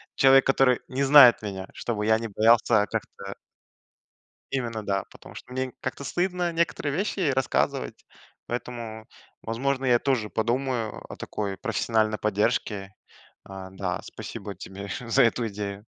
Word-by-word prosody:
человек, 135 0 +6
который 135 -2 +4
не 135 +2 -1
знает 135 -3 +8
меня, 95 -3 -5
чтобы 105 -3 -3
я 110 0 +4
не 115 0 -5
боялся 110 0 +4
как-то - - -6 1.2
Именно, 115 -5 -2
да. 100 -1 0
Потому - - -14
что 125 - -11
мне 130 +1 -1
н 130 - -10
как-то 130 +2 -4
стыдно 175 +3 -1
некоторые 165 -3 -1
вещи 200 +3 -2
ей 155 -7 +2
рассказывать, 130 0 -1 0.4
поэтому, 115 -2 -6 0.4
возможно, 135 +4 -2
я 120 -2 +4
тоже 125 -6 0
подумаю 120 0 -2
о - - -7
такой 100 -2 -4
профессиональной 110 0 0
поддержке. 105 -2 -1 0.5
А, 95 -1 -9
да. 95 -1 -3
Спасибо - - -8
тебе 100 +1 -9
за 125 +2 +3
эту 115 0 +1
идею. 100 0 -6
115 Hz, 145 wpm, -26 LUFS, 105-130 Hz, 1.2 s, знает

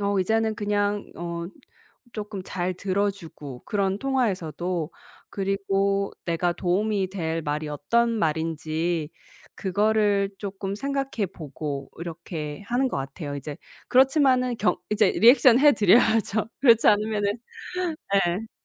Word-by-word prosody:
어 200 -1 0
이제는 220 +3 +1
그냥 205 0 -1
어 170 0 -4 0.7
쪼끔 210 -2 -5
잘 185 0 -2
들어 200 +2 0
주고 150 -9 -10
그런 195 -1 0
통화에서도 180 - -1 0.4
그리고 195 0 0
내가 170 +1 0
도움이 195 +2 0
될 165 -4 -2
말이 150 +1 -3
어떤 230 +12 +1
말인지 160 -2 -1 0.5
그거를 205 0 +1
쪼끔 195 -1 -5
생각해 275 -4 -2
보고 145 -2 -6
이렇게 165 -1 -6
하는 250 +4 +1
것 - - -3
같아요 145 +2 -5
이제. 145 +1 -6 0.3
그렇지마는 260 -2 +4
경 180 - +2
이제 210 -2 +3
리액션 245 +1 +6
해 295 0 +7
드려야죠. 220 0 +3
그렇지 230 -4 +5
않으면은 205 -1 +2 0.9
예. 200 +6 -3
195 Hz, 265 characters per minute, -25 LUFS, 170-220 Hz, 0.9 s, 해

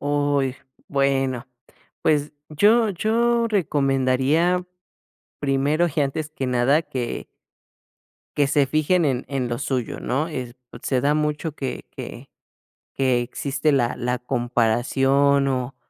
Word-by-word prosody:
Uy, 145 -2 0 0.3
bueno, 135 -3 0 0.6
pues, 150 -1 +1 0.2
yo 210 +8 +4
yo 230 +5 +1
recomendaría, 145 - +1 0.8
primero 145 +4 +1
y - - 0
antes 150 +2 -2
que 135 -4 -4
nada, 125 +5 +3
que 125 -6 -5 1.1
que 145 -2 +3
se 145 -1 +3
fijen 155 +5 +2
en 130 -4 0
en 135 -3 -2
lo 120 0 -2
suyo, 130 -4 -3
¿no? 150 +6 -1
Eh, 125 -6 -5 0.2
pues, - - -12
se 130 -2 +1
da 145 +3 +2
mucho 150 +1 -1
que 135 -4 -5
que - - -8 0.7
que 130 -2 +2
existe 140 +4 -1
la 120 -4 +1
la 125 0 -1
comparación, 135 +3 +2
o 130 -1 -2
140 Hz, 125 wpm, -23 LUFS, 130-155 Hz, 1.1 s, yo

